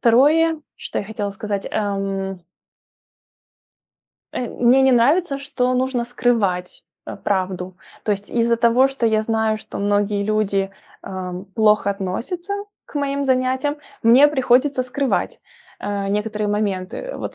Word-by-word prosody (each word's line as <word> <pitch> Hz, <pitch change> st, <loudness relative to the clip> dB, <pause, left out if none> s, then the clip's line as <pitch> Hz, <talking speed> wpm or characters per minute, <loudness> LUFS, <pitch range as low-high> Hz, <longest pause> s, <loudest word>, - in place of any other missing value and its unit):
2, 305 Hz, +7 st, +4 dB, 0.2 s
что -, -, -4 dB
я -, -, -6 dB
хотела 205 Hz, -1 st, -4 dB
сказать, 200 Hz, -1 st, -4 dB
эм 195 Hz, -2 st, -2 dB, 1.9 s
Э, 245 Hz, -, -3 dB
мне 250 Hz, +2 st, +4 dB
не 265 Hz, 0 st, +5 dB
нравится, 275 Hz, +5 st, +3 dB
что 255 Hz, -3 st, -1 dB
нужно 255 Hz, -1 st, 0 dB
скрывать, 225 Hz, -7 st, -1 dB, 0.2 s
э, -, -, -6 dB
правду, 185 Hz, -2 st, -2 dB, 0.3 s
то 210 Hz, -, +2 dB
есть 200 Hz, +1 st, -5 dB
из-за 235 Hz, 0 st, +2 dB
того, 235 Hz, +3 st, +4 dB
что 270 Hz, -4 st, -1 dB
я 215 Hz, -1 st, +2 dB
знаю, 220 Hz, -1 st, 0 dB
что -, -, -8 dB
многие 205 Hz, 0 st, +1 dB
люди, 200 Hz, -2 st, 0 dB, 0.3 s
ам, 185 Hz, 0 st, -6 dB
плохо 210 Hz, -2 st, +3 dB
относятся 230 Hz, -, -3 dB, 0.3 s
к -, -, -19 dB
моим 280 Hz, 0 st, -1 dB
занятиям, 260 Hz, +2 st, +1 dB, 0.3 s
мне 250 Hz, +6 st, +7 dB
приходится 265 Hz, -1 st, +2 dB
скрывать, 260 Hz, +2 st, -1 dB, 0.4 s
э, 200 Hz, -1 st, -2 dB
некоторые 210 Hz, +1 st, -1 dB
моменты. 205 Hz, -, -2 dB
Вот, -, -, -5 dB
225 Hz, 130 wpm, -21 LUFS, 200-260 Hz, 1.9 s, мне